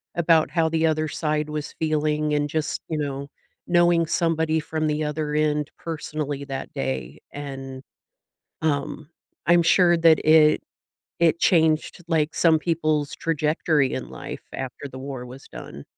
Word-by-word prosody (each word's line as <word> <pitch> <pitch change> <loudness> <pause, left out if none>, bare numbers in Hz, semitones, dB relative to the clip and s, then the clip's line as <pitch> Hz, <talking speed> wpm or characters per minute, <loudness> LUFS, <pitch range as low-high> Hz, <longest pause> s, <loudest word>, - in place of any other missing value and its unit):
about 165 -2 +3
how 165 -2 +2
the 160 0 +1
other 155 0 +1
side 150 0 -1
was 150 0 -5
feeling 155 -1 0
and 145 0 0
just, 155 0 -2
you 160 - -1
know, 140 -1 -3 0.4
knowing 175 -1 +4
somebody 160 -2 +1
from 155 0 -2
the 150 0 0
other 150 0 -2
end 150 -1 0
personally 150 -3 -4
that 135 -1 -6
day, 65 0 -4
and, 135 -2 -7 0.8
um, 150 0 -2 0.4
I'm 170 0 +5
sure 175 +1 +5
that 165 -1 +5
it 155 -1 +6 0.6
it 170 -1 +3
changed, 160 -1 +2
like, 160 -2 +1
some 165 -2 +4
people's 155 -3 0
trajectory 155 -2 +1
in - - -4
life - - -8
after 135 +2 -6
the 130 - -10
war 130 -1 -6
was 125 +2 -11
done 70 +1 -9
155 Hz, 145 wpm, -24 LUFS, 145-160 Hz, 0.8 s, it